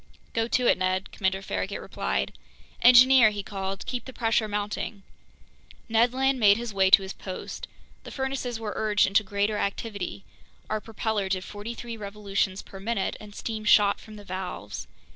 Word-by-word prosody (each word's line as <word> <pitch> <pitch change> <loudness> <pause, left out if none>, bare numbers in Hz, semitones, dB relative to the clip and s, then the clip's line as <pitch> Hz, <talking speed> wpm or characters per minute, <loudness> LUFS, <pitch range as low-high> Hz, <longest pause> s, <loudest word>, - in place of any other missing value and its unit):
"Go 225 0 +1
to 250 +1 +1
it, 190 - +4
Ned," 185 +1 0
Commander 190 0 -1
Farragut 95 - -3
replied. 65 +1 -2 0.5
"Engineer," 250 -1 +8
he 205 -1 -5
called, 195 -1 -5
"keep 250 -1 -4
the 260 - -7
pressure 225 -2 +1
mounting!" 205 0 -3 0.8
Ned 230 +1 +3
Land 265 +1 +1
made 205 -2 +6
his 235 -2 -5
way 190 -1 +4
to 195 - +7
his 190 - -6
post. 185 -2 -7 0.4
The - - -8
furnaces 265 -3 -3
were 215 -2 -4
urged 210 -2 +3
into 195 +3 +3
greater 205 +1 0
activity; 200 -2 -3 0.5
our 215 0 0
propeller 220 -3 -2
did 185 -1 -1
forty 210 +4 -7
three 235 -1 -7
revolutions 200 -2 -2
per 195 - -11
minute, 205 0 -1
and 210 -1 -12
steam 220 -2 -4
shot 205 -1 +5
from 215 - -12
the 205 - -11
valves. 180 - -5
210 Hz, 170 wpm, -27 LUFS, 195-230 Hz, 0.8 s, Engineer